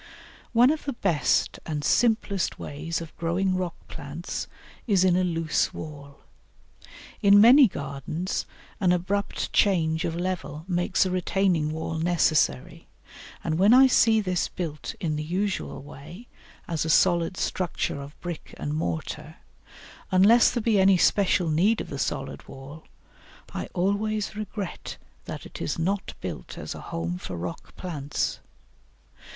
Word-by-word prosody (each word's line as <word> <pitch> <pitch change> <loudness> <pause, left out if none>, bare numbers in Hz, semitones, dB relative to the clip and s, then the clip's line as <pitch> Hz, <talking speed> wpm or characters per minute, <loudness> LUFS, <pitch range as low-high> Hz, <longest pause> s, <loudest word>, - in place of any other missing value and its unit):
One 245 +3 +5
of 310 - -3
the 280 - -2
best 175 - +1
and 150 -2 -4
simplest 220 -4 +1
ways 165 +4 -4
of 165 -2 -9
growing 180 +3 0
rock 180 -2 -2
plants 150 +5 -6 0.4
is 195 -4 +3
in 185 -2 +4
a 185 - +2
loose 165 -2 0
wall. 140 -2 -9 1.0
In 200 -1 +7
many 250 +5 +8
gardens 145 +2 -4 0.3
an 185 -4 +3
abrupt 190 +3 -2
change 165 -5 +2
of 165 - -2
level 175 -3 -4
makes 175 +1 +1
a 185 - -1
retaining 180 -3 +1
wall 160 +1 -3
necessary, 165 -1 +1 0.6
and 160 0 -1
when 205 +6 +6
I 265 +1 +8
see 225 -3 +4
this 185 -4 0
built 160 -5 -5
in 155 -3 -1
the 150 - -3
usual 185 -3 -2
way 160 - -11 0.4
as 165 -2 -1
a 160 - -3
solid 175 +1 +3
structure 175 -5 -2
of 140 +1 -11
brick 175 -3 -7
and 145 - -3
mortar 85 - -4 0.7
unless 205 +6 +6
there 240 -3 -2
be 215 -3 +3
any 190 0 +5
special 185 -1 +3
need 195 +9 +3
of - - -5
the 140 - -4
solid 135 0 -3
wall 140 +4 -11 0.7
I - - -4
always 205 +3 0
regret 210 -2 -6 0.3
that - - -7
it - - -10
is - - -2
not 190 +4 -2
built - - -6
as - - -5
a - - -9
home 85 +2 -4
for 90 - -6
rock 85 0 -7
plants. 150 -6 -3
175 Hz, 145 wpm, -26 LUFS, 155-200 Hz, 1.0 s, many